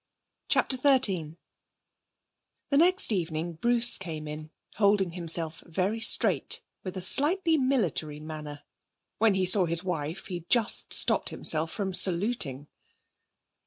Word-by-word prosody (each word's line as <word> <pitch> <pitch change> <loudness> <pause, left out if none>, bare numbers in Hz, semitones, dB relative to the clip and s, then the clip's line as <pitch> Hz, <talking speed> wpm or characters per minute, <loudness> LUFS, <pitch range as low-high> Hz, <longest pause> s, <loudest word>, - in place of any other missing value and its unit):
CHAPTER 260 - +2
XIII 205 - +2 1.3
The 280 - +2
next 360 -2 +3
evening 170 -3 -3
Bruce 235 +7 +3
came 160 -5 -7
in, 155 +1 -8 0.3
holding 200 -3 +2
himself 165 -2 -3
very 190 +6 -2
straight, 225 - +3 0.2
with 185 0 -7
a 185 - -4
slightly 330 - +1
military 185 - -1
manner. 150 -2 -9 0.6
When 215 -2 +3
he 190 -1 0
saw 185 0 +4
his 170 +1 +1
wife 165 -1 -5
he 175 -3 -7
just 235 -4 +1
stopped - - +3
himself 160 +1 -2
from 195 -2 -4
saluting. 175 - 0
185 Hz, 125 wpm, -27 LUFS, 160-225 Hz, 1.3 s, saw